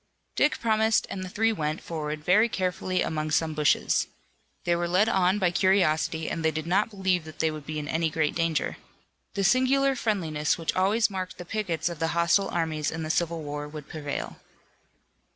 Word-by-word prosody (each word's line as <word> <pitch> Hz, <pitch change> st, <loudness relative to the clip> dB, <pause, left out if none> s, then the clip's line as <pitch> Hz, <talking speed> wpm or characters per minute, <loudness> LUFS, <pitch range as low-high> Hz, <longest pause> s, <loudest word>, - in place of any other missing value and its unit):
Dick 300 Hz, -, +2 dB
promised 220 Hz, -1 st, +2 dB
and 185 Hz, -, -4 dB
the 185 Hz, -, -6 dB
three 225 Hz, +4 st, +1 dB
went 155 Hz, -5 st, -2 dB
forward 155 Hz, -2 st, -5 dB
very 210 Hz, +8 st, +4 dB
carefully 185 Hz, -1 st, -1 dB
among 155 Hz, -1 st, -2 dB
some 160 Hz, 0 st, +1 dB
bushes. 150 Hz, -1 st, +2 dB, 0.6 s
They 175 Hz, -, +2 dB
were 175 Hz, 0 st, -1 dB
led 185 Hz, +5 st, +3 dB
on 190 Hz, -3 st, +2 dB
by 185 Hz, -4 st, +2 dB
curiosity 170 Hz, -4 st, +2 dB
and 165 Hz, -, -3 dB
they 160 Hz, -, +4 dB
did 155 Hz, 0 st, -4 dB
not 190 Hz, +6 st, +2 dB
believe 190 Hz, -4 st, 0 dB
that 155 Hz, -, -11 dB
they 160 Hz, -1 st, +1 dB
would 155 Hz, -2 st, -8 dB
be 155 Hz, 0 st, -4 dB
in 150 Hz, -1 st, -4 dB
any 160 Hz, +2 st, 0 dB
great 155 Hz, -1 st, 0 dB
danger. 165 Hz, -3 st, -1 dB, 0.6 s
The 200 Hz, -, 0 dB
singular 260 Hz, +6 st, +3 dB
friendliness 165 Hz, -, 0 dB
which 165 Hz, -2 st, -2 dB
always 205 Hz, +4 st, +2 dB
marked 185 Hz, -1 st, -5 dB
the 180 Hz, -, -8 dB
pickets 175 Hz, -5 st, -2 dB
of 170 Hz, -3 st, -4 dB
the 165 Hz, +1 st, -1 dB
hostile 170 Hz, +4 st, +3 dB
armies 160 Hz, -3 st, -1 dB
in 160 Hz, 0 st, -4 dB
the 155 Hz, -, -1 dB
Civil 170 Hz, -1 st, -1 dB
War 145 Hz, 0 st, -5 dB
would 150 Hz, -1 st, -9 dB
prevail. 145 Hz, -3 st, -5 dB
170 Hz, 190 wpm, -27 LUFS, 155-195 Hz, 0.6 s, very